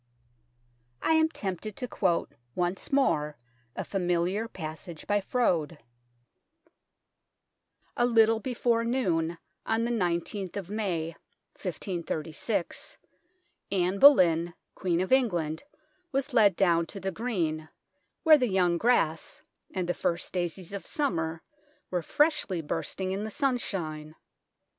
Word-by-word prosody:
I - - +3
am 320 0 +4
tempted 200 - -5
to 250 - -4
quote 180 -7 0 0.2
once 180 +1 -2
more 150 - +2 0.4
a - - -3
familiar 180 +3 0
passage 160 -3 -8
by 205 0 +1
Froude: 175 -9 0 2.2
A 240 - +3
little 225 -1 +4
before 235 -1 0
noon 175 -9 0 0.3
on 225 +1 0
the 235 - 0
igth 185 -1 -1
of 195 -1 -6
May 170 -7 -2 2.6
Anne 190 0 +1
Boleyn, 175 - +6 0.2
Queen 175 -2 0
of 185 - -3
England, 175 - +2 0.5
was 275 -1 -1
led 205 -5 +5
down 170 -3 +3
to 200 - -7
the 190 +1 -2
green, 165 -8 -2 0.5
where 315 -3 +8
the 250 -2 +1
young 180 -3 +2
grass 165 -10 +1 0.3
and 185 -2 -2
the 175 - +1
first 170 -1 -1
daisies 180 +1 -2
of 200 - -6
summer 165 - -1 0.5
were 180 -1 0
freshly 295 - +1
bursting 185 +4 -3
in 195 +2 -2
the 220 - -3
sun 260 +1 +1
shine. 155 -7 -4
190 Hz, 120 wpm, -28 LUFS, 170-230 Hz, 2.6 s, where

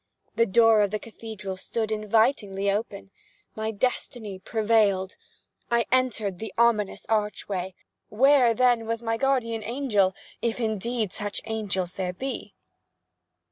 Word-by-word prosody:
The 230 +1 +3
door 225 +2 +5
of 205 - +2
the 215 - -1
cathedral 215 -4 -8
stood 220 +3 -2
invitingly 215 -2 +1
open. 200 -2 -4 0.4
My 220 0 -2
destiny 220 -2 -2
prevailed. 210 -3 +1 0.5
I 235 0 +2
entered 225 -7 +1
the 220 - -5
ominous 225 -4 +2
archway. 205 -4 -2 0.3
Where 255 0 +5
then 245 -2 +3
was 230 +1 -2
my 225 0 0
guardian 230 -4 0
angel?—if 225 -2 -1
indeed 220 -1 -1
such 205 -1 -2
angels 195 -5 -2
there 185 -1 -3
be. 265 +9 -6
220 Hz, 120 wpm, -26 LUFS, 200-235 Hz, 0.5 s, door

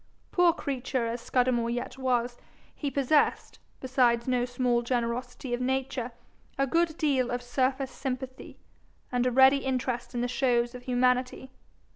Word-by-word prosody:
Poor 355 -1 +5
creature 265 -5 -2
as 230 +1 -3
Scudamore 245 -2 +1
yet 240 +1 -3
was, 245 -2 -1 0.3
he 290 - -3
possessed, 280 +2 +1 0.2
besides 250 -2 +2
no 250 -1 +1
small 245 -1 0
generosity 245 +1 -3
of 240 - -1
nature, 260 -1 -1 0.5
a 275 - +2
good 330 +3 +1
deal 270 -6 +1
of 245 0 -3
surface 260 +2 0
sympathy, 260 -1 -6 0.5
and 250 0 +1
a - - +1
ready 265 +2 +6
interest 255 -2 -2
in 240 - 0
the 245 - 0
shows 240 -1 +1
of 250 - -8
humanity. 250 +1 0
255 Hz, 145 wpm, -28 LUFS, 245-265 Hz, 0.5 s, ready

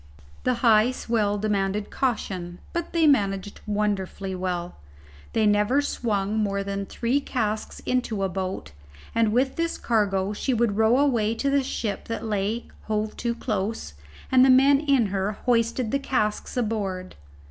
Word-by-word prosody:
The 255 - +2
high 220 0 +6
swell 220 -5 0
demanded 205 -1 -1
caution, 185 -9 -2 0.2
but 340 -1 -3
they 335 -1 +3
managed 200 -8 +1
wonderfully 200 -2 -1
well. 180 -1 -3 0.6
They 220 -1 +2
never 210 +6 +3
swung 215 -6 -1
more 200 -2 0
than 200 0 -4
three 245 +4 0
casks 220 -6 -3
into 235 -5 -1
a - - +2
boat, 185 - -4 0.4
and 225 -2 +2
with 260 +4 +1
this 335 0 -1
cargo 205 -3 +1
she 255 +4 -1
would 230 -3 +1
row 225 +3 +4
away 235 -6 +2
to 275 +4 0
the 280 0 +3
ship 220 -5 -3
that 230 0 -4
lay 210 +2 -1 0.2
hove 215 0 -2
to 235 -1 -1
close, 210 - -3 0.4
and 255 -1 +6
the 265 - +6
men 270 +2 +6
in 280 -5 +3
her 195 +2 0
hoisted 235 -1 +1
the 275 - +1
casks 215 -4 -1
aboard. 200 -6 -2
215 Hz, 155 wpm, -25 LUFS, 200-245 Hz, 0.6 s, high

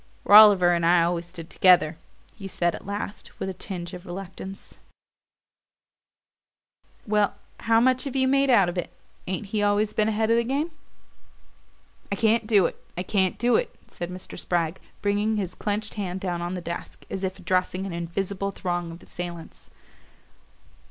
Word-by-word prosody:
"Rolliver 205 -4 +8
and 170 -1 0
I 170 0 +5
always 170 0 -1
stood 170 -1 -10
together," 175 -4 +5 0.4
he 195 -3 -8
said 175 -2 0
at - - -9
last, 200 0 -6
with 190 - -3
a - - -4
tinge 175 -2 -6
of 180 -1 -8
reluctance. 190 +1 -8 2.3
"Well, 210 -1 +1 0.2
how 225 0 +3
much 255 +3 +2
have 275 -1 -5
you 260 -1 +3
made 275 +1 +3
out 205 -7 +5
of 175 +1 -2
it? - - -5 0.4
Ain't 190 +3 -3
he 210 - +1
always 205 +1 +2
been 215 - +2
ahead 220 +1 +1
of 230 - +4
the 235 - +2
game?" 280 +7 -1 1.4
"I - - +1
can't 225 +1 +2
do 205 -5 +5
it - - -4
I 180 - -2
can't 190 -1 +1
do 240 +1 +2
it," - - -3
said 175 - -6
Mr. 185 0 -8
Spragg, 170 0 -1 0.2
bringing 205 +2 +1
his 185 -3 -2
clenched 210 +1 -3
hand 190 -3 -4
down 175 -2 -3
on 175 +1 -3
the 180 - -4
desk, 170 0 -7
as 195 - -4
if 190 0 -2
addressing 185 0 -1
an 190 - -5
invisible 190 +3 -3
throng 175 -3 -3
of 170 +2 -11
assailants. 175 -2 -8
190 Hz, 170 wpm, -25 LUFS, 175-215 Hz, 2.3 s, Rolliver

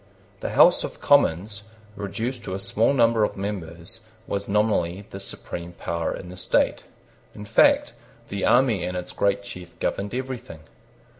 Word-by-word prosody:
The - - -4
House - - +7
of - - -6
Commons, 100 +5 +3 0.3
reduced 115 +5 -4
to 95 - -3
a - - -4
small 105 +5 +2
number 115 -4 +4
of - - -1
members, 95 +1 -5 0.3
was 100 -2 -3
nominally 100 -3 +1
the 95 - -6
supreme 85 -3 -6
power 85 -1 -2
in 90 - -6
the 90 - -9
state. 90 - +1 0.5
In 105 - -8
fact, - - +4 0.4
the 100 -1 -3
army 120 -7 +4
and 90 +1 -2
its 90 0 -5
great 100 0 +1
chief 90 -3 -10
governed 100 +4 -2
everything. 130 -11 -5
100 Hz, 155 wpm, -24 LUFS, 90-110 Hz, 0.5 s, House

